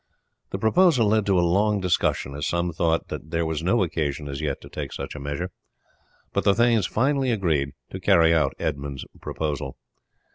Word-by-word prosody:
The -, -, -3 dB
proposal 125 Hz, -, +4 dB
led 110 Hz, -1 st, +2 dB
to 95 Hz, -2 st, +3 dB
a 85 Hz, -, +3 dB
long 100 Hz, +4 st, +2 dB
discussion, 90 Hz, -6 st, 0 dB
as 75 Hz, +1 st, -3 dB
some 85 Hz, 0 st, -1 dB
thought 80 Hz, 0 st, 0 dB
that 80 Hz, -, -6 dB
there 85 Hz, 0 st, 0 dB
was 80 Hz, -1 st, -2 dB
no 95 Hz, +5 st, +2 dB
occasion 75 Hz, -3 st, -2 dB
as 70 Hz, -1 st, -5 dB
yet -, -, -2 dB
to -, -, -11 dB
take -, -, -6 dB
such -, -, -6 dB
a 75 Hz, -, -7 dB
measure; 75 Hz, +6 st, -4 dB, 0.8 s
but -, -, +1 dB
the 100 Hz, 0 st, +4 dB
thanes 115 Hz, -5 st, +3 dB
finally 135 Hz, +2 st, +1 dB
agreed 80 Hz, -, 0 dB, 0.2 s
to 95 Hz, -, -5 dB
carry 85 Hz, -4 st, +5 dB
out 75 Hz, -5 st, +2 dB
Edmund's 70 Hz, -2 st, -3 dB, 0.2 s
proposal. 70 Hz, -4 st, -3 dB
85 Hz, 185 wpm, -24 LUFS, 75-105 Hz, 0.8 s, carry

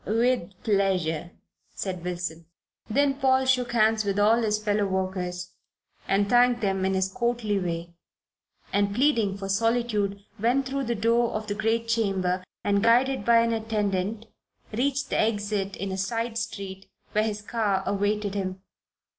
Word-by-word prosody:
"With 225 Hz, -3 st, +1 dB
pleasure," 185 Hz, -6 st, +1 dB, 0.5 s
said 185 Hz, -3 st, -4 dB
Wilson. 170 Hz, -2 st, -4 dB, 0.4 s
Then 275 Hz, +4 st, +2 dB
Paul 265 Hz, -1 st, +3 dB
shook 250 Hz, -2 st, +1 dB
hands 220 Hz, -1 st, +3 dB
with 200 Hz, -1 st, -1 dB
all 220 Hz, +3 st, +4 dB
his 210 Hz, -2 st, +1 dB
fellow 210 Hz, -1 st, 0 dB
workers 185 Hz, -2 st, -3 dB, 0.6 s
and 200 Hz, +1 st, +2 dB
thanked 245 Hz, +1 st, +4 dB
them 195 Hz, -2 st, 0 dB
in 190 Hz, 0 st, +1 dB
his 190 Hz, 0 st, +1 dB
courtly 225 Hz, -1 st, -1 dB
way, 170 Hz, -1 st, -4 dB, 0.8 s
and, 200 Hz, 0 st, +1 dB
pleading 230 Hz, -7 st, +2 dB
for 195 Hz, -1 st, -5 dB
solitude, 210 Hz, -1 st, 0 dB, 0.2 s
went 245 Hz, +5 st, +2 dB
through 270 Hz, +1 st, -2 dB
the 235 Hz, 0 st, -1 dB
door 230 Hz, +2 st, +2 dB
of 215 Hz, 0 st, -3 dB
the 205 Hz, -, -2 dB
great 225 Hz, +2 st, 0 dB
chamber 195 Hz, -5 st, 0 dB, 0.2 s
and, 200 Hz, 0 st, +2 dB
guided 245 Hz, +2 st, +3 dB
by 230 Hz, +1 st, +5 dB
an 230 Hz, 0 st, +1 dB
attendant, 215 Hz, -1 st, -1 dB, 0.5 s
reached 275 Hz, +5 st, -1 dB
the -, -, +1 dB
exit 205 Hz, -2 st, -1 dB
in 195 Hz, 0 st, -4 dB
a 190 Hz, -, -3 dB
side 230 Hz, +3 st, -2 dB
street 200 Hz, -3 st, -6 dB, 0.2 s
where 215 Hz, -, +2 dB
his 210 Hz, -1 st, -3 dB
car 205 Hz, -4 st, 0 dB
awaited 205 Hz, 0 st, 0 dB
him. 190 Hz, -2 st, -3 dB
210 Hz, 155 wpm, -26 LUFS, 195-230 Hz, 0.8 s, by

